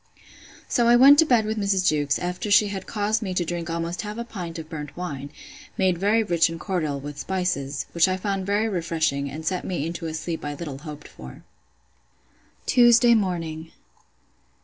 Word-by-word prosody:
So 240 -1 +2
I 240 - +6
went 275 +4 +8
to 325 - +5
bed 235 -5 +3
with 215 0 -2
Mrs. 195 -2 +1
Jewkes, 145 -3 +2
after 180 +4 -4
she 205 0 +5
had 195 -1 -6
caused 215 +1 -1
me 190 -4 -4
to 175 - 0
drink 170 0 -4
almost 170 +1 -3
half 210 +2 -6
a 235 - -3
pint 180 -7 -7
of 160 -1 -7
burnt 150 -2 -8
wine, 145 -6 -5 0.5
made 185 -3 +1
very 210 +4 +3
rich 170 -4 +2
and 165 0 -6
cordial, 155 -7 -2
with 145 +1 -8
spices; 180 -8 -2
which 170 +1 +3
I 185 0 0
found 195 -1 -3
very 205 +2 +1
refreshing, 165 -7 -1
and 155 +3 -7
set 185 -1 -1
me 170 -5 -3
into 165 0 -4
a 160 - -4
sleep 165 +1 -4
I 145 0 -4
little 145 -3 -6
hoped 150 0 -9
for. 65 0 -12 1.2
Tuesday 240 -1 +6
morning. 165 -6 -2
175 Hz, 190 wpm, -24 LUFS, 160-205 Hz, 1.2 s, went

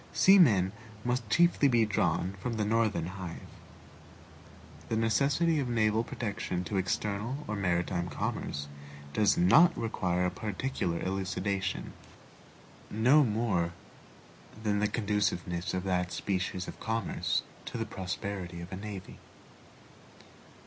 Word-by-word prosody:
Seamen 120 - +6 0.3
must 125 -3 -1
chiefly 170 -4 +4
be 120 -4 +4
drawn 95 -2 0
from 125 +4 -3
the 110 -2 -1
Northern 110 -5 +1
hive. 90 -1 -7 1.5
The 115 - 0
necessity 140 +8 +2
of 130 -3 -1
naval 110 -1 +2
protection 100 -6 -3
to 100 - -3
external 105 +8 -2
or 105 - -2
maritime 90 -2 0
commerce 70 0 -3 0.5
does 105 -2 +3
not 165 - +6
require 90 -5 0
a 90 - 0
particular 100 -3 -2
elucidation, 95 0 -2 1.0
no 130 +8 +5
more 105 -8 0 0.9
than 105 -1 +1
the 105 - +2
conduciveness 100 -5 -1
of 90 - -2
that 90 -2 0
species 90 -1 -2
of - - -8
commerce 115 0 -1 0.2
to - - -5
the 115 - -2
prosperity 95 -3 -5
of 85 +2 -8
a - - -4
navy. 100 -2 -8
105 Hz, 120 wpm, -30 LUFS, 90-115 Hz, 1.5 s, Seamen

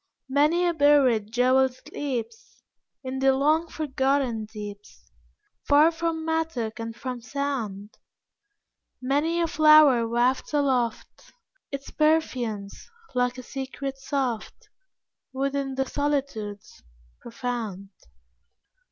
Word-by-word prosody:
Many 300 +6 +3
a 345 - +2
buried 275 -8 +3
jewel 255 +2 +3
sleeps 260 - -6 0.4
In 260 0 -4
the 270 0 +4
long 310 +5 +2
forgotten 270 -6 -1
deeps, 210 -1 -10 0.6
Far 300 +3 +6
from 325 -1 -3
mattock 320 -10 -2
and 230 0 -5
from 250 -1 -6
sound; 230 -7 -4 1.0
Many 290 +6 0
a - - +3
flower 305 -6 +6
wafts 245 +5 0
aloft 255 -5 -1 0.4
Its 275 -1 -6
perfumes, 250 -10 -1 0.2
like 250 0 0
a 255 - -7
secret 270 +1 -6
soft, 265 -5 -3 0.6
Within 275 0 -2
the 270 0 0
solitudes, 270 -8 -3 0.4
profound. 230 -5 -5
265 Hz, 100 wpm, -25 LUFS, 235-290 Hz, 1.0 s, Far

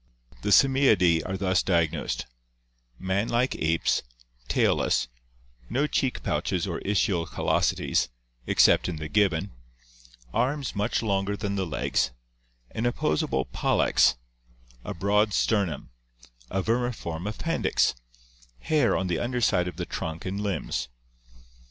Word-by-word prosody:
The - - -2
Simiidae 105 -9 +5
are 95 +1 -3
thus 95 -2 +2
diagnosed: 85 -8 0 0.7
Man 95 - -1
like 120 +2 +1
apes, 80 +1 +1 0.5
tailless; - - +2 0.6
no 140 +4 +1
cheek 135 -4 -1
pouches - - -1
or - - -3
ischial 95 -4 0
callosities, - - +1 0.4
except - - +4
in 90 - -3
the 75 0 -5
gibbon; 100 -1 +1 0.8
arms 135 +1 -1
much 105 +4 0
longer 100 -1 0
than 100 -1 -3
the 95 -2 -1
legs, 65 -4 0 0.6
an 115 +2 -1
opposable 75 - 0
pollex, - - +2 0.7
a - - -5
broad 105 +3 +2
sternum, 100 - 0 0.6
a 95 0 -1
vermiform 110 -7 -2
appendix, 165 +10 0 0.7
hair 150 -6 +2
on 95 - -1
tie 85 -3 -1
under 125 +1 -2
side 90 -6 +2
of 90 - -5
the 90 0 -4
trunk 80 0 -5
and 95 +2 -3
limbs. 100 -2 -2
100 Hz, 120 wpm, -26 LUFS, 85-115 Hz, 0.8 s, Simiidae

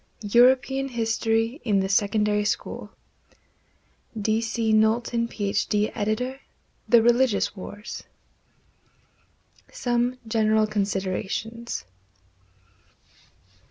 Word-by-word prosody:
European 255 +5 +3
History 225 +1 -1
in 205 -4 +2
the 190 - 0
Secondary 210 +1 +1
School 210 - -3 1.3
D. 215 +2 +1
C. 230 -1 0
KNOWLTON, 230 +2 +2
PH.D., 210 0 -1
Editor. 235 +5 -2 0.5
THE 235 -2 +6
RELIGIOUS 240 -4 +2
WARS. 205 +3 -8 1.7
Some 245 +1 0
General 220 -1 +2
Considerations. 205 - -3
225 Hz, 75 wpm, -25 LUFS, 210-240 Hz, 1.7 s, THE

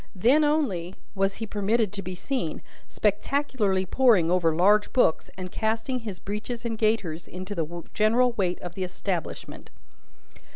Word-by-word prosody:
Then 250 +11 +4
only 225 - 0 0.2
was 195 -1 0
he 225 - -4
permitted 210 0 0
to 200 - -4
be 185 -1 -6
seen, 180 - -3 0.3
spectacularly 210 -3 0
poring 200 -6 +4
over 170 -3 +2
large 205 +5 +4
books, 245 -11 +2
and 185 -1 -6
casting 225 +4 -1
his 210 -5 -6
breeches 215 +5 -5
and 230 -1 -1
gaiters 215 -7 0
into 185 +2 -6
the 170 -1 -4
general 235 +4 +3
weight 185 -6 -1
of 175 -1 -6
the 185 - -3
establishment. 180 -1 -5
205 Hz, 150 wpm, -26 LUFS, 180-230 Hz, 0.3 s, Then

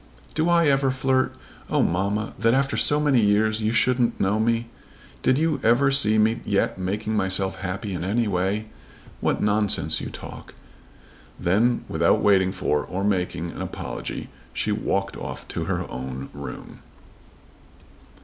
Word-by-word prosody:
"Do 160 +2 +1
I 170 -1 +4
ever 135 -2 +3
flirt? 130 0 +1 0.3
Oh, - - +2
mamma, 100 +5 -1
that 115 +2 +3
after 135 +1 +1
so 145 - +3
many 145 -5 +3
years 110 +1 +2
you 110 +1 +1
shouldn't 120 +1 +2
know 100 +2 +1
me! 115 +1 +1 0.5
Did 130 0 +3
you 155 0 +1
ever 125 +5 +4
see 110 -6 +3
me 110 +2 +2
yet 100 -1 0
making 105 +4 -2
myself 95 -1 +1
happy 95 +2 -4
in 90 - -3
any 110 +5 0
way? 100 +3 0 0.5
What - - 0
nonsense 105 -1 +2
you - - -5
talk!" - - -10 0.8
Then 115 +7 +2
without 85 +1 +2
waiting 95 -2 +3
for, 75 -6 0
or 95 +2 -4
making, 90 -4 -1
any - - -8
apology, - - -5 0.2
she 105 - -1
walked 100 -2 -1
off - - -7
to - - -3
her - - -2
own 65 +1 -6
room. - - -8
105 Hz, 150 wpm, -24 LUFS, 95-120 Hz, 0.8 s, I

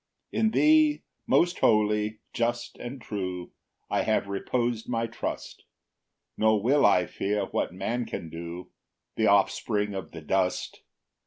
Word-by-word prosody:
8 - - -1
In 220 - +4
thee, 305 +4 +4 0.2
most 175 +1 +3
holy, 105 0 +2
just, 120 0 -1
and 125 +3 -6
true, 95 -5 -5 0.4
I - - +1
have - - +1
repos'd 115 +4 -2
my 115 -1 0
trust; 115 +1 -5 0.7
Nor 110 -1 +3
will 140 +4 +5
I 90 - +4
fear 100 +3 -2
what - - -2
man 120 0 -3
can 85 - -5
do, 85 +2 -7 0.4
The - - +2
offspring 105 -1 +2
of 95 -1 -5
the 80 - -9
dust. 90 +4 -1
110 Hz, 140 wpm, -27 LUFS, 95-120 Hz, 0.7 s, will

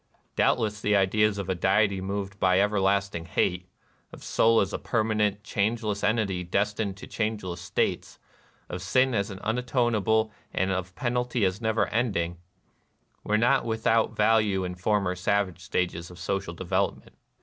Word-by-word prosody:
Doubtless 105 -3 +1
the 105 0 +2
ideas 100 +2 +2
of 100 -2 -4
a 95 - +1
deity 95 +2 +2
moved 100 0 -4
by 95 0 +3
everlasting 100 -3 +1
hate, 90 +2 0 0.2
— - - -39
of - - -12
soul 115 0 +3
as 95 - 0
a - - -2
permanent, 105 -2 0
changeless 110 -2 -1
entity 100 -5 +1
destined 100 +2 -1
to - - -9
changeless 105 -6 -3
states, 90 - -2 0.3
— - - -35
of 90 - -6
sin 130 +8 +2
as 100 -2 0
unatonable 110 0 0 0.2
and 95 +1 +1
of 95 0 -3
penalty 125 -3 0
as 95 +4 -1
never 110 -1 +1
ending, 95 -8 -1 0.4
— - - -43
were 105 - +1
not 125 +5 +3
with 110 -1 -3
out 115 0 +2
value 105 -3 +3
in 90 -1 -3
former 90 0 0
savage 95 0 0
stages 90 -1 -2
of 90 - -12
social 95 -2 -3
development. 95 +3 -2
100 Hz, 160 wpm, -27 LUFS, 95-110 Hz, 0.4 s, by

